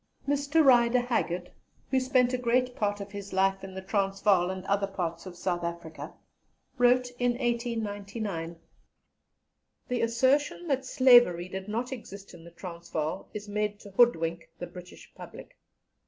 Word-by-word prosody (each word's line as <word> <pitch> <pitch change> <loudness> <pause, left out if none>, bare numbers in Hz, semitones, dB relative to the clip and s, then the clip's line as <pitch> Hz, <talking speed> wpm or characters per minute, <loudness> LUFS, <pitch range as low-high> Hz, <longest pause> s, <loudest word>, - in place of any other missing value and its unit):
Mr. 285 +2 +2
Rider 245 -1 +5
Haggard, 180 -8 -2 0.4
who 265 - +4
spent 255 -1 +2
a - - +2
great 250 +1 +1
part 205 -1 -1
of 200 0 -8
his 200 -1 -7
life 195 0 +1
in 190 -1 -8
the 190 - -6
Transvaal 195 -2 +2
and 190 0 -5
other 200 0 +1
parts 175 -2 -4
of 180 - -9
South 175 -1 -2
Africa, 170 -2 -6 0.7
wrote 245 0 +4
in 245 0 +2
1899: 215 -7 -3 1.3
"The 250 -1 0
assertion 260 +8 +1
that 265 -1 0
Slavery 240 -11 +5
did 190 +1 -6
not 235 +5 -3
exist 200 -6 -9
in 170 -2 -13
the - - -10
Transvaal 170 -3 -5
is 210 0 -6
made 210 0 -2
to 200 - -12
hoodwink 170 -7 +2
the 175 - -5
British 180 0 -13
public. - - -12
205 Hz, 150 wpm, -28 LUFS, 185-245 Hz, 1.3 s, Rider